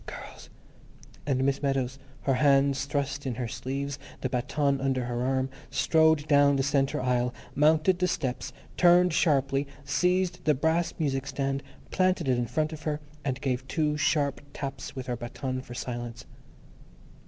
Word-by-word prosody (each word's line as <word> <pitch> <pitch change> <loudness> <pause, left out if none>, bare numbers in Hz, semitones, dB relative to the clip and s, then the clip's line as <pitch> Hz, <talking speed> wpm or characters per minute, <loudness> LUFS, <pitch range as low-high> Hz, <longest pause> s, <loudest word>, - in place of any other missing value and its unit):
girls!" - - -9 0.8
and 130 -2 +1
Miss 135 0 +1
Meadows, 135 -2 -1 0.2
her 135 - +1
hands 140 0 +3
thrust 140 -1 -2
in 125 - -2
her 120 0 -3
sleeves, 135 +3 -4 0.2
the 130 - -1
baton 140 +2 0
under 130 -2 0
her 120 0 -2
arm, 130 +1 +1 0.2
strode 160 -2 +3
down 145 -1 +5
the 135 - +1
centre 140 0 +1
aisle, 125 -1 +1 0.2
mounted 155 +5 +3
the 180 - +2
steps, 155 -9 -2 0.3
turned 175 0 +5
sharply, 140 -3 +2 0.2
seized 180 +4 +1
the 150 - +4
brass 160 +4 +1
music 135 -4 -1
stand, 135 0 -1 0.3
planted 185 -4 +2
it 125 -2 +2
in 120 - -1
front 155 +6 -1
of 155 - -8
her, 150 -1 -2 0.2
and 130 -3 -2
gave 130 -1 -1
two 150 -1 0
sharp 145 -2 +1
taps 135 -2 -6
with 130 -1 -5
her 125 -1 -2
baton 130 +2 -4
for 120 -1 -10
silence. 120 -1 -5
140 Hz, 160 wpm, -28 LUFS, 130-150 Hz, 0.8 s, down